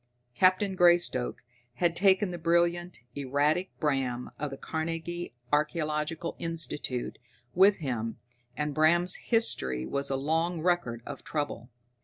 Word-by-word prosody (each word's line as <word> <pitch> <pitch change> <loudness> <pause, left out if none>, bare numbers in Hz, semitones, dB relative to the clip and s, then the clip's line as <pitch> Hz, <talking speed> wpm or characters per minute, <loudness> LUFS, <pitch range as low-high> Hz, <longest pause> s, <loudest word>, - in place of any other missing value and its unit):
Captain 185 +6 +3
Greystoke 175 -10 +3 0.3
had 170 +1 +1
taken 190 +1 +3
the 175 - -6
brilliant, 170 0 +1
erratic 145 +6 0
Bram, 135 -5 -1
of 150 - -2
the 135 - -7
Carnegie 165 -1 -4 0.2
Archaeological 155 +1 -1
Institute, 155 -6 -3 0.3
with 195 +2 +6
him, 120 -7 -3 0.4
and 150 -1 -1
Bram's 170 +4 +3
history 65 - +1
was 140 - -1
a 135 - 0
long 160 +4 0
record 170 -10 0
of 145 -2 -8
trouble. 145 -5 -4
160 Hz, 120 wpm, -29 LUFS, 140-175 Hz, 0.4 s, with